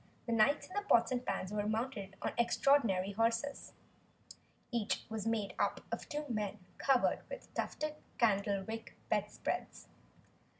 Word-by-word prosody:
The 235 - -2
knights 230 +6 +4
in - - -13
their 410 - 0
pots 235 - +4
and 250 -1 0
pans 185 -5 -2
were 210 0 0
mounted 215 -3 -2
on - - 0
extraordinary 235 -5 +3
horses. 230 +6 0 1.0
Each 230 -3 0
was 220 -1 -3
made 220 -3 0
up - - +1
of - - -4
two 295 0 -2
men 210 -4 -2 0.2
covered 270 -3 +3
with - - -8
tufted 305 0 -2 0.2
candlewick 205 0 +1 0.2
bedspreads. - - -2
230 Hz, 135 wpm, -35 LUFS, 205-265 Hz, 1.0 s, knights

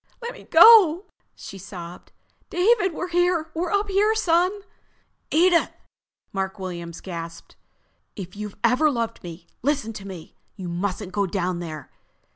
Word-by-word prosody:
"Let 475 0 -6
me - - -14
go!" 395 -5 +7 0.3
she 195 - -10
sobbed. 180 -2 -10 0.4
"David, 380 +2 +2
we're 355 +3 -5
here! 350 -2 +1
We're 340 +2 -2
up 405 +3 0
here, 410 +3 +2
son!" 365 0 +1 0.7
"Edith!" 340 +2 +3 0.6
Mark 195 0 -3
Williams 170 -3 -7
gasped. 170 -2 -8 0.6
"If 185 -2 -8
you've 210 -1 -7
ever 255 +7 +4
loved 230 -4 -3
me, 170 0 -10 0.2
listen 275 -4 -1
to 195 -2 -9
me. 180 -5 -10 0.2
You 185 -3 -7
mustn't 185 +2 -3
go 200 -1 0
down 180 -1 -2
there. 155 -3 -8
225 Hz, 140 wpm, -23 LUFS, -, 0.7 s, go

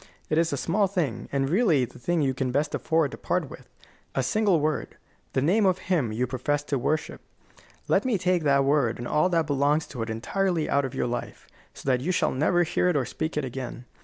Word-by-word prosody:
It 155 - +3
is 165 0 +1
a 140 - -1
small 200 +8 +1
thing, 170 - -2
and 135 -1 0
really 165 - +3
the 125 - -15
thing 165 +5 0
you 135 -1 +1
can 130 -1 -2
best 145 +3 0
afford 160 -4 +1
to - - -9
part - - -1
with: - - -12 0.5
a 135 - +1
single 195 - +2
word 155 +1 -2 0.4
the 130 - +1
name 195 +6 +3
of 185 -1 +2
Him 160 - 0
you 120 +4 0
profess 135 +3 -1
to 140 -2 -1
worship. 150 +5 -2 0.7
Let - - +3
me 250 -5 +1
take 180 -1 +1
that 140 -2 +3
word 140 -5 +2
and 120 - -5
all 155 +5 +2
that 165 -3 +2
belongs 145 +2 +1
to 125 -4 -6
it 115 - -3
entirely 165 - -1
out 140 -1 +2
of 130 - -6
your - - 0
life, 120 0 -5 0.3
so - - -12
that 130 -2 +2
you 170 +7 0
shall 180 - +1
never 175 +6 +2
hear 180 +2 +1
it 175 - +1
or 135 -3 +1
speak 155 +4 -4
it 150 - 0
again. 125 -1 -6
145 Hz, 230 wpm, -26 LUFS, 130-175 Hz, 0.7 s, It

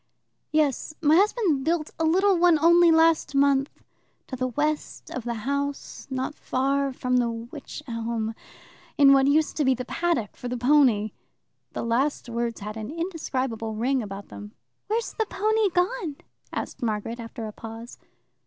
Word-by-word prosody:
"Yes. 305 0 0
My 305 0 +4
husband 390 - +2
built 320 0 0
a - - +1
little 380 +4 +4
one 345 -1 +5
only 340 +2 +6
last 325 -2 +3
month, 275 0 +3 0.6
to 260 - -6
the 255 0 -1
west 295 +4 -2
of 250 -2 -5
the 235 -1 -2
house, 280 +1 -3
not 260 +1 -2
far 275 0 0
from 250 -1 0
the 240 -1 +2
wych 235 +6 -8
elm, 230 -1 -3 0.6
in 275 -1 +7
what 270 0 +4
used 300 +2 +2
to 305 - +2
be 265 -1 +3
the 250 +1 -5
paddock 335 -9 -1
for 245 - -7
the 250 0 -3
pony." 245 -5 +3 0.6
The - - -3
last 245 +3 0
words 235 -1 -3
had 210 +2 -6
an 220 +1 -5
indescribable 265 - -3
ring 255 +4 +1
about 200 -2 -8
them. 105 0 -10 0.3
"Where's 450 +3 -1
the 445 -2 -1
pony 430 +1 +1
gone?" 360 - -1 0.4
asked - - -5
Margaret 225 +1 -2
after 230 0 -7
a 215 - -5
pause. 225 +2 -10
275 Hz, 160 wpm, -25 LUFS, 235-320 Hz, 0.6 s, in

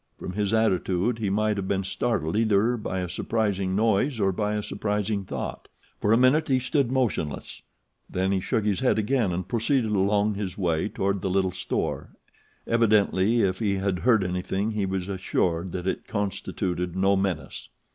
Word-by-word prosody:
From 90 - -6
his 100 0 0
attitude 110 0 +1
he 105 -3 -1
might 105 +1 +1
have 95 -1 -3
been 95 0 0
startled 95 -4 -1
either 110 +2 +3
by 95 -5 -3
a 90 - -3
surprising 95 0 -1
noise 110 +4 +2
or 95 -2 +2
by 105 +2 -1
a 105 - -2
surprising 105 -1 -2
thought. - - -5 0.3
For 105 - +1
a 115 - +6
minute 130 +6 +4
he 130 - +3
stood 130 0 0
motionless; 115 - -2 0.5
then 95 +1 0
he 95 - +2
shook 105 +3 -1
his 100 -3 +1
head 130 - +2
again 110 -2 +1
and 90 +1 -3
proceeded 115 +2 +1
along 100 +1 +2
his 100 -3 -4
way 85 -1 0
toward 100 -1 -1
the 95 - -1
little 95 0 +1
store; 95 0 -3 0.5
evidently 110 -1 +3
if 95 -2 +1
he 105 -3 +1
had 95 -1 -1
heard 115 -3 +3
anything 95 +3 -2
he 105 -3 -1
was 95 -1 -2
assured 95 -2 -1
that 90 -1 -4
it 95 - -2
constituted 90 -3 -2
no 95 +1 +3
menace. 95 -4 -3
100 Hz, 175 wpm, -26 LUFS, 95-110 Hz, 0.5 s, a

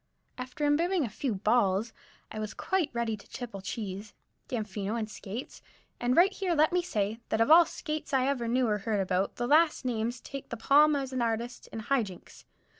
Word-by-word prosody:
After 255 +4 -4
imbibing 330 +3 +2
a - - -4
few 225 +2 -2
"balls," 210 +1 +2 0.4
I 215 - -5
was 215 -1 -5
quite 375 -6 0
ready 235 -2 -1
to 205 - -16
tipple 230 -6 -7
Cheese, 205 0 -6 0.3
Damfino 215 -2 -3
and 225 -2 -2
Skates, 215 +3 -7 0.4
and 245 +1 +1
right 380 +3 +6
here 370 -4 -1
let 310 +3 +3
me 360 - +3
say, 215 - -2
that 220 - 0
of 230 +6 +3
all 335 +1 +9
skates 310 0 -5
I 265 -2 +3
ever 260 -4 0
knew 250 +1 +2
or 210 -1 +1
heard 210 0 -1
about, 190 0 0
the 240 - -2
last 310 +1 +3
named 235 0 -2
takes 275 -1 -8
the 235 - -5
palm 295 +5 +5
as 270 -2 -3
an 255 - -1
artist 235 +1 -2
in 225 - -6
"high 270 +3 +2
jinks." 190 -5 -10
240 Hz, 200 wpm, -29 LUFS, 215-280 Hz, 0.4 s, all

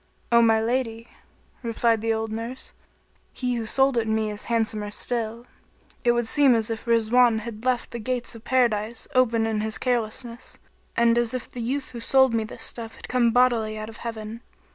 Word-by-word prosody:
"O 235 0 +6
my 225 -1 +4
lady," 230 0 -2 0.5
replied 230 -2 +1
the 225 0 0
old 220 0 -2
nurse, 230 +4 -6 0.6
"he 250 -1 -2
who 230 -2 -3
sold 270 0 +3
it 225 - -2
me 220 -1 0
is 210 - -6
handsomer 220 -3 0
still. 230 +1 -3 0.6
It 240 - +4
would 240 -1 0
seem 270 +1 +4
as 225 0 0
if 225 +1 -5
Rizwan 230 0 +4
had 225 0 -8
left 255 -2 0
the 235 - -5
gates 250 +2 -2
of 230 -1 -12
Paradise 235 -3 +1
open 235 -3 +3
in 220 -1 -1
his 220 0 -2
carelessness, 240 0 -2 0.4
and 235 0 +4
as 240 +1 0
if 250 - -5
the 245 - -7
youth 260 +4 -3
who 240 - -7
sold 265 +1 +4
me 225 -1 +1
this 225 +1 -7
stuff 225 -1 -4
had - - -11
come 245 -2 +3
bodily 230 -3 +2
out 215 +1 -6
of 225 - -11
Heaven. 225 0 -6
230 Hz, 190 wpm, -25 LUFS, 220-245 Hz, 0.6 s, O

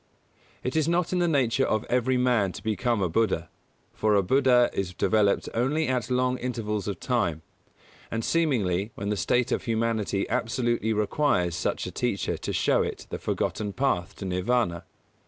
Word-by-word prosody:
It 125 - -2
is 155 -1 +2
not 175 +1 +1
in 180 - +1
the 175 - +2
nature 135 -5 +2
of 110 -4 +1
every 125 +1 +1
man 120 -7 +2
to - - -9
become 110 -1 0
a - - +2
Buddha; 85 -3 0 0.4
for 105 -1 +2
a 100 - +3
Buddha 125 +3 +4
is 90 -2 -3
developed 105 -2 +2
only 145 +7 +1
at 125 -3 -1
long 125 0 +1
intervals 105 -5 -3
of 100 -4 -3
time, 85 - -1 0.7
and 115 0 -3
seemingly, 110 - +1
when 100 0 -4
the 105 - +1
state 120 +5 +1
of - - -1
humanity 110 -4 0
absolutely 120 -1 0
requires 105 - +1
such - - -2
a - - -5
teacher - - -1
to - - -5
show - - +2
it - - -4
the - - -4
forgotten 105 -2 -2
Path 105 -8 -1
to 100 - -7
Nirvāna. 90 -1 0
115 Hz, 175 wpm, -26 LUFS, 100-125 Hz, 0.7 s, Buddha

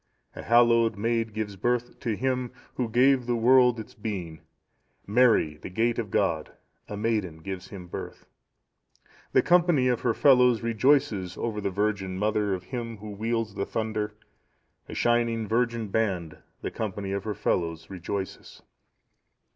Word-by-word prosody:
"A - - -6
hallowed 115 -2 +4
maid 115 +1 0
gives 105 -1 -4
birth 120 +4 -1
to 115 -3 -2
Him 130 0 -1 0.2
Who 125 -3 -2
gave 125 +2 +3
the 120 - +1
world 125 0 +5
its 110 - -9
being; 95 -8 -5 0.6
Mary, 110 -9 +3
the - - -8
gate 115 +5 0
of 110 -3 -3
God, 90 -7 0 0.4
a 105 - -5
maiden 105 -7 -1
gives 95 +3 -7
Him 95 -3 -9
birth. 85 - -8 1.1
"The - - +5
company 170 -7 +4
of 125 - 0
her 120 -2 +1
fellows 125 -4 +5
rejoices 115 -5 +2
over 110 -3 -3
the 100 - -1
Virgin 100 -1 -1
Mother 105 -1 +1
of 90 - -8
Him 115 +1 -5
Who 105 +1 -8
wields 110 +1 -2
the 100 - -2
thunder; 110 -1 -2 0.7
a - - -6
shining 115 -2 +1
virgin 115 -1 0
band, 95 -7 -1 0.2
the - - -3
company 100 -2 -4
of 100 0 -2
her 105 -2 -2
fellows 85 -1 -2
rejoices. 95 +1 -6
110 Hz, 150 wpm, -27 LUFS, 100-120 Hz, 1.1 s, world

